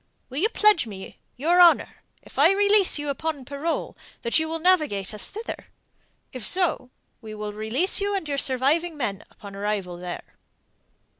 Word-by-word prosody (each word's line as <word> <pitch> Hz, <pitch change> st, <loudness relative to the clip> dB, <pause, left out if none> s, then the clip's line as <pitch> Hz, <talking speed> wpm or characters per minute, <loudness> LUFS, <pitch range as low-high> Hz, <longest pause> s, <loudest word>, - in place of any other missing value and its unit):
Will 265 Hz, -, -4 dB
you 425 Hz, +6 st, +2 dB
pledge 420 Hz, -, +3 dB
me 190 Hz, -3 st, -10 dB, 0.2 s
your 340 Hz, +7 st, +3 dB
honour, 345 Hz, -1 st, +5 dB, 0.3 s
if -, -, -10 dB
I -, -, +6 dB
release 405 Hz, -2 st, +4 dB
you 295 Hz, 0 st, -4 dB
upon 285 Hz, -1 st, -3 dB
parole, 285 Hz, +5 st, -3 dB, 0.3 s
that 235 Hz, +7 st, +2 dB
you 320 Hz, 0 st, -2 dB
will 325 Hz, -, -2 dB
navigate 305 Hz, -, +1 dB
us 210 Hz, -, -2 dB
thither? 440 Hz, +3 st, -7 dB, 0.7 s
If 255 Hz, -3 st, -6 dB
so, 345 Hz, -, +1 dB, 0.3 s
we 215 Hz, -2 st, -9 dB
will 210 Hz, 0 st, -5 dB
release 235 Hz, -, +2 dB
you 405 Hz, 0 st, 0 dB
and 380 Hz, -5 st, -3 dB
your 280 Hz, -1 st, -2 dB
surviving 295 Hz, +6 st, 0 dB
men 210 Hz, -7 st, -3 dB
upon 200 Hz, -1 st, -12 dB
arrival 200 Hz, -3 st, -3 dB
there." 175 Hz, 0 st, -9 dB
285 Hz, 165 wpm, -24 LUFS, 215-350 Hz, 0.7 s, I